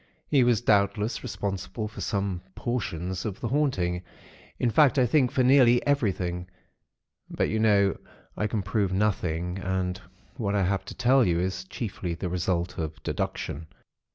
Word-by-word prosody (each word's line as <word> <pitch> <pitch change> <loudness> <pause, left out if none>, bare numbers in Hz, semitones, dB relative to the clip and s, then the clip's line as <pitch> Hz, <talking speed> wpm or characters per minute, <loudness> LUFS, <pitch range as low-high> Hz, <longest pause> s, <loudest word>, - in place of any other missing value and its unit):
He 140 -4 +5
was 120 -2 +3
doubtless 105 0 +2
responsible 100 +2 -4
for 110 - -9
some 100 -3 -1
portions 95 -7 -3
of 105 -4 -4
the 115 - -3
'haunting'; 95 -11 0 0.6
in 120 - +1
fact 145 +4 +5
I 130 - +5
think 130 +1 +3
for 130 - +2
nearly 125 -2 +5
everything; 90 -10 0 0.8
but, - - 0
you 110 - 0
know, 100 -3 +4 0.4
I 105 - 0
can 105 -2 -2
prove 100 0 0
nothing, 90 -3 0
and 90 -1 -2 0.4
what 105 -3 -1
I 100 - +2
have 95 +2 0
to - - -8
tell 130 +2 +4
you 85 -5 +2
is 95 +1 -2
chiefly 95 -3 -4
the 90 +1 -4
result 90 0 -1
of 80 -1 -5
deduction. 80 +3 -3
100 Hz, 155 wpm, -27 LUFS, 90-120 Hz, 0.8 s, He